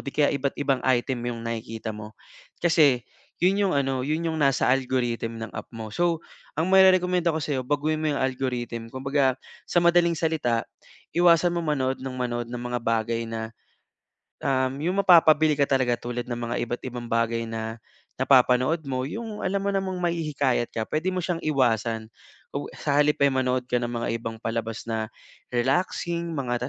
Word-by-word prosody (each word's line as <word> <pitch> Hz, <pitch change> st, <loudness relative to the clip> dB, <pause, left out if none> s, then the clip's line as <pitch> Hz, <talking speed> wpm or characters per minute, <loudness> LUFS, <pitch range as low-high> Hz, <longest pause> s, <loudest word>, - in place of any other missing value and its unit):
'di 140 Hz, -, -4 dB
kaya 150 Hz, -1 st, +3 dB
iba't 140 Hz, 0 st, -1 dB
ibang 135 Hz, -2 st, +1 dB
item 130 Hz, 0 st, +1 dB
yung 115 Hz, -1 st, -6 dB
nakikita 115 Hz, -1 st, -4 dB
mo. 105 Hz, 0 st, -9 dB, 0.5 s
Kasi 150 Hz, -7 st, +4 dB, 0.4 s
yun 185 Hz, +2 st, +4 dB
yung -, -, 0 dB
ano, 135 Hz, -2 st, 0 dB
yun 160 Hz, +3 st, -1 dB
yung 160 Hz, -, -3 dB
nasa 140 Hz, -2 st, +3 dB
algorithm 125 Hz, -3 st, 0 dB
ng 110 Hz, -, -6 dB
app -, -, -7 dB
mo. 110 Hz, -1 st, -6 dB
So, 170 Hz, +4 st, 0 dB, 0.3 s
ang 160 Hz, +3 st, +1 dB
mairerekomenda 180 Hz, -2 st, +5 dB
ko 160 Hz, -, -1 dB
sa'yo, 140 Hz, -3 st, -1 dB
baguhin 150 Hz, +2 st, 0 dB
mo 155 Hz, -1 st, +1 dB
yung -, -, -2 dB
algorithm. 125 Hz, -3 st, -2 dB
Kumbaga 135 Hz, 0 st, +1 dB, 0.3 s
sa -, -, +2 dB
madaling 170 Hz, -1 st, +4 dB
salita 150 Hz, -8 st, 0 dB, 0.5 s
iwasan 175 Hz, 0 st, +5 dB
mong 170 Hz, -1 st, -2 dB
manood 130 Hz, 0 st, -1 dB
ng 130 Hz, -1 st, -5 dB
manood 120 Hz, -2 st, -2 dB
ng 120 Hz, 0 st, -5 dB
mga 120 Hz, 0 st, -1 dB
bagay 115 Hz, 0 st, 0 dB
na, 115 Hz, 0 st, -5 dB, 0.9 s
um, 130 Hz, -1 st, +1 dB
yung 180 Hz, +5 st, +1 dB
mapapabili 155 Hz, -3 st, +6 dB
ka 140 Hz, -, +5 dB
talaga 130 Hz, -3 st, +2 dB
tulad 120 Hz, 0 st, -4 dB
ng 120 Hz, -, -2 dB
mga 120 Hz, 0 st, -3 dB
iba't 120 Hz, -, -4 dB
ibang 120 Hz, -1 st, -6 dB
bagay 115 Hz, 0 st, +1 dB
na 110 Hz, 0 st, -5 dB, 0.4 s
napapanood 130 Hz, +4 st, +4 dB
mo, 130 Hz, -1 st, -2 dB
yung 225 Hz, +3 st, -6 dB
alam 195 Hz, +1 st, 0 dB
mo 200 Hz, -, 0 dB
namang 190 Hz, -1 st, -1 dB
mahihikayat 150 Hz, -8 st, 0 dB
ka, 110 Hz, -1 st, -2 dB
puwede 155 Hz, +4 st, -1 dB
mo 185 Hz, -, -1 dB
siyang 175 Hz, -2 st, -1 dB
iwasan 115 Hz, -6 st, 0 dB, 0.4 s
kung -, -, -4 dB
sa 145 Hz, -, -2 dB
halip 150 Hz, 0 st, +3 dB
ay 140 Hz, -, +5 dB
manood 130 Hz, -1 st, 0 dB
ka 125 Hz, -, +2 dB
ng 120 Hz, -, -2 dB
mga 120 Hz, -1 st, -3 dB
ibang 115 Hz, 0 st, -5 dB
palabas 115 Hz, -1 st, -3 dB
na 110 Hz, -1 st, -2 dB, 0.4 s
relaxing, 170 Hz, +6 st, 0 dB
mga 125 Hz, -2 st, -2 dB
130 Hz, 175 wpm, -25 LUFS, 120-160 Hz, 0.9 s, mapapabili